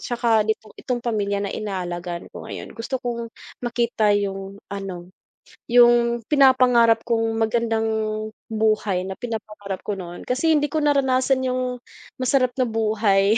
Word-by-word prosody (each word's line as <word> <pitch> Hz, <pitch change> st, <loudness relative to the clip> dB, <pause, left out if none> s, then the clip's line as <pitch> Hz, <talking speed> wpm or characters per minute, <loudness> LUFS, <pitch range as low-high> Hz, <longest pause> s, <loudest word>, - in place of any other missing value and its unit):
tsaka 230 Hz, -3 st, +1 dB
ito 220 Hz, 0 st, -2 dB
itong 250 Hz, -1 st, -2 dB
pamilya 205 Hz, -4 st, 0 dB
na 200 Hz, -, -3 dB
inaalagaan 175 Hz, -4 st, -4 dB
ko -, -, -9 dB
ngayon. -, -, -7 dB
Gusto 235 Hz, +3 st, -3 dB
kong 235 Hz, -1 st, -3 dB, 0.4 s
makita 235 Hz, -3 st, +1 dB
yung 195 Hz, 0 st, -4 dB
ano, 185 Hz, -3 st, -6 dB, 0.6 s
yung 240 Hz, 0 st, +5 dB
pinapangarap 250 Hz, -5 st, +5 dB
kong 225 Hz, -1 st, 0 dB
magandang 225 Hz, 0 st, +1 dB, 0.6 s
buhay 215 Hz, -4 st, +1 dB
na 190 Hz, -, -4 dB
pinapangarap 210 Hz, -4 st, -5 dB
ko 205 Hz, -, -1 dB
noon. 175 Hz, -2 st, -8 dB
Kasi 300 Hz, +6 st, +2 dB
hindi 295 Hz, -, +1 dB
ko 310 Hz, +2 st, -1 dB
naranasan 265 Hz, -2 st, +2 dB
yung 255 Hz, -1 st, -1 dB, 0.4 s
masarap 255 Hz, -1 st, +2 dB
na 255 Hz, -, +2 dB
buhay 215 Hz, -2 st, +2 dB
225 Hz, 135 wpm, -23 LUFS, 205-245 Hz, 0.6 s, yung